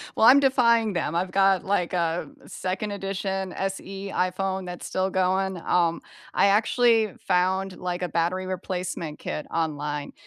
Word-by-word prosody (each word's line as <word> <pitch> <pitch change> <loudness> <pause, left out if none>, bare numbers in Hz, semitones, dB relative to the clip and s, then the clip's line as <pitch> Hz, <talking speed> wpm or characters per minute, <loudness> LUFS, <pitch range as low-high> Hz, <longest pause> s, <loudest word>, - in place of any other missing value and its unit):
well, - - +4
I'm 270 +3 +9
defying 235 -5 +3
them. 170 -3 -1
I've 180 +2 -1
got, 195 -2 +3
like, 190 -3 0
a 170 -1 -1 0.2
2nd 190 +3 -4
edition 195 -1 -3
SE 195 0 -4
iPhone 190 +1 -1
that's 180 -1 -7
still 190 0 -1
going. 190 0 0
Um, 170 0 +1 0.3
I - - +4
actually 220 +1 +3
found, 185 +1 +1
like, 180 0 -3
a 180 - 0
battery 175 +4 0
replacement 180 -4 -4
kit 150 - -4
online. 150 -3 -2
185 Hz, 145 wpm, -25 LUFS, 180-195 Hz, 0.3 s, I'm